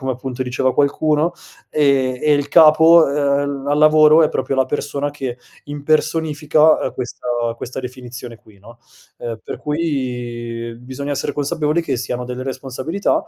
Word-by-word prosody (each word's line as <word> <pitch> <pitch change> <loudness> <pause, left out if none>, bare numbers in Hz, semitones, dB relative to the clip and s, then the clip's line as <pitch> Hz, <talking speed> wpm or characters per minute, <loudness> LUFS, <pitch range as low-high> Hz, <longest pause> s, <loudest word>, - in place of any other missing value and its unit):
come 130 -1 -2
appunto 130 +1 -5
diceva 130 +1 -1
qualcuno 150 +3 +1 0.4
e 135 -4 +1
e 150 -1 +3
il 145 -1 +1
capo, 160 +1 +7
ehm, 140 -1 -1
al 145 - +2
lavoro 155 +1 +6
è 155 - +2
proprio 135 - -2
la 130 - +3
persona 145 0 -3
che 130 -4 -5 0.3
impersonifica 155 +1 +1
questa, 125 0 -7 0.2
uhm, 115 - -4
questa 125 +2 -7
definizione 125 -2 -9
qui 105 -2 -21
no, 115 +4 -16 0.4
uhm, 115 -1 -5
per - - -6
cui 120 -6 -4
bisogna 130 +3 -6
essere 140 - -2
consapevoli 150 +3 -1
che 135 -6 -2
si 125 - -4
hanno 125 0 -3
delle 125 +1 -6
responsabilità 135 - -2
140 Hz, 155 wpm, -19 LUFS, 125-150 Hz, 0.4 s, capo